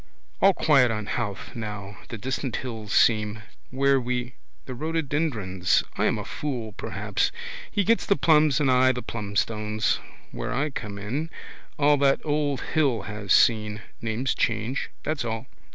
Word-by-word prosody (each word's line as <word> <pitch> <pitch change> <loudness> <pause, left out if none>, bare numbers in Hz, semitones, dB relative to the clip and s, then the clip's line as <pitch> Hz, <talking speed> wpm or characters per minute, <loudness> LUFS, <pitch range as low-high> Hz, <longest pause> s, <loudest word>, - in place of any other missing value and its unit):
All 195 -1 +6
quiet 135 -5 +5
on 105 -2 -2
Howth 105 0 -4
now. 105 -3 -6
The 115 - -5
distant 130 +2 -3
hills 110 -5 -5
seem. 105 -1 +3 0.3
Where 135 0 +3
we. 125 0 -2 0.3
The 130 - -6
rhododendrons. 130 - 0
I - - +1
am - - +2
a - - -5
fool 125 -7 -4
perhaps. - - -1 0.4
He 205 - +1
gets 230 +4 +2
the 200 - +4
plums, 155 -6 +4
and 140 -3 +3
I 130 +1 +5
the 125 - -5
plumstones. 105 0 -1 0.3
Where - - -4
I 150 +3 0
come 105 -6 -5
in. 130 +11 -3 0.5
All 145 0 +4
that 140 -1 +3
old 145 -2 0
hill 140 -9 +2
has 105 -2 -5
seen. 105 -2 +4 0.2
Names 115 +4 -1
change: 115 +4 -1
that's 155 -3 -1
all. 115 -1 -3
125 Hz, 150 wpm, -26 LUFS, 105-140 Hz, 0.5 s, All